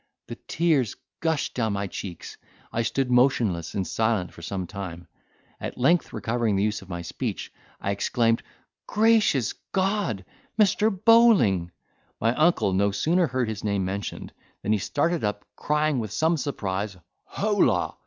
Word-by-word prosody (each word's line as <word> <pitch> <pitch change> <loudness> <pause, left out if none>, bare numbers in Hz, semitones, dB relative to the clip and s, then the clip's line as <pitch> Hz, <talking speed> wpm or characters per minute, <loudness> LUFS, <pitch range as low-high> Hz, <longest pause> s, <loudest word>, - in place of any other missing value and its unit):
The - - -6
tears 155 -9 +1 0.2
gushed 160 -2 -1
down 110 -4 0
my 100 0 -2
cheeks; 90 -2 -7 0.4
I 115 - +1
stood 125 +2 -1
motionless 120 - +2
and 95 - 0
silent 110 -5 0
for - - -12
some 95 +2 -4
time. 85 -3 -7 0.5
At - - -6
length, 150 +8 +2
recovering 110 0 0
the 95 - +1
use 105 0 -1
of 85 -2 -6
speech, - - -4 0.3
I 100 - -1
exclaimed, 115 +3 +1 0.5
"Gracious 210 - +3 0.2
God! 190 - 0 0.3
Mr. 215 +1 +4
Bowling!" 195 - +4 0.5
My 115 +1 +2
uncle 125 - +2
no 100 +2 +3
sooner 160 - +2
heard 130 -2 -1
his 110 -2 -5
name 100 -3 0
mentioned, 100 +2 -5 0.3
than 105 - 0
he 105 - +1
started 160 - 0
up, 105 0 -2
crying, 150 -2 +1
with 110 -4 -4
some 160 +10 +2
surprise, 100 - -3 0.3
"Holla!" 205 0 +1
115 Hz, 145 wpm, -25 LUFS, 100-160 Hz, 0.5 s, Mr